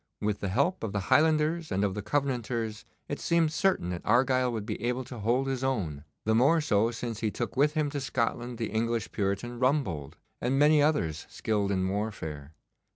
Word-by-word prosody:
With 105 -1 -1
the 100 - -2
help 140 - +1
of 110 - -3
the 100 - 0
Highlanders 155 +1 +3
and 95 +2 +1
of 100 -2 +1
the 105 - -4
Covenanters 120 -3 -2 0.2
it - - -4
seemed 165 -2 +2
certain 180 - +1
that 85 - -4
Argyle 130 0 +3
would 110 -3 -4
be 105 -2 -4
able 125 +2 0
to 125 -1 -9
hold 120 +6 +1
his 135 -1 -2
own, 85 - -2 0.2
the 110 - +3
more 140 +9 +5
so 115 -7 +2
since 115 -2 -5
he 110 - 0
took 120 +3 -4
with 150 +3 +3
him 150 -2 +1
to 145 -1 -3
Scotland 120 -1 -2
the 110 -3 -3
English 115 +1 -1
Puritan 105 +4 -2
Rumbold, 125 - 0 0.3
and 130 +3 +1
many 150 +1 +5
others 85 - 0
skilled 105 -2 -1
in 95 -1 +1
warfare. 85 -8 -4
120 Hz, 195 wpm, -29 LUFS, 105-135 Hz, 0.3 s, more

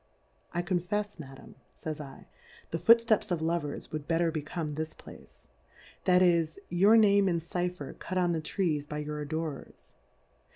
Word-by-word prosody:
I 175 0 -1
confefs, 190 +2 -2
Madam, 135 -3 -11 0.2
fays 155 -2 -5 0.4
/, - - -24
the 165 - -2
Foot 230 +6 +8
fteps 225 -3 +1
of 175 - +1
Lovers 160 -3 -2
would 155 -1 -5
better 165 0 +2
become 155 0 -4
tliis 155 +2 -5
Place; - - -15 0.6
that 180 0 +5
is, 170 -3 +2
your 195 +6 +5
Name 200 -2 +5
and 170 -2 +1
Cy 175 +2 -2
pher 150 -6 -8
cut 185 - -4
on 175 -1 +2
the 165 -2 -1
Trees 155 -4 -1
by 150 - -5
your 150 0 -4
Adorers.' 155 -1 -6
170 Hz, 165 wpm, -30 LUFS, 155-185 Hz, 0.6 s, Foot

